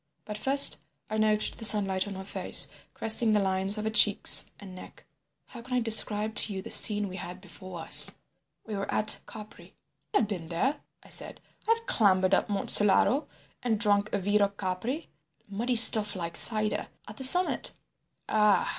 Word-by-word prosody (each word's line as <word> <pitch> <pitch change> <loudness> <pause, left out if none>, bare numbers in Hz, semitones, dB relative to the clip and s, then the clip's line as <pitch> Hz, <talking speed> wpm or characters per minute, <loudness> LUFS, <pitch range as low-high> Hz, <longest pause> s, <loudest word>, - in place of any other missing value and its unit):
But 210 - -9
first 275 +6 +3 0.3
I 215 - -4
noted 215 0 -2
the - - -10
sunlight 195 -3 +3
on 200 - -9
her 190 - -10
face 195 - -3 0.3
caressing 220 0 +1
the 210 - 0
lines 190 +1 -1
of 215 - -7
her 220 - -5
cheeks 210 -2 +4
and 195 -2 -14
neck. 185 - -16 0.4
How 240 - -13
can 250 +2 -8
I - - 0
describe 220 -2 +3
to 210 - +1
you - - -6
the - - -11
scene 210 -1 +2
we 185 0 -11
had 180 0 -11
before 185 -2 -13
us? - - +7 0.6
We 215 - -8
were 195 0 -7
at 215 0 +1
Capri—" 215 -1 -15 0.4
"I - - +4
have 225 - -2
been 180 -6 -8
there," 255 - -4 0.2
I - - -20
said. - - -9 0.3
"I 455 - +2
have 460 - -16
clambered 185 - -1
up - - -1
Monte 200 -1 -3
Solaro 210 +8 +4 0.3
and 225 -4 -4
drunk 205 -1 0
vero 205 +1 -1
Capri—muddy 200 - -8
stuff 220 -2 +6
like 170 -2 -8
cider—at 215 +1 -2
the 265 - -7
summit." 355 +8 -1 0.5
"Ah!" 210 -2 0
210 Hz, 175 wpm, -25 LUFS, 190-220 Hz, 0.6 s, us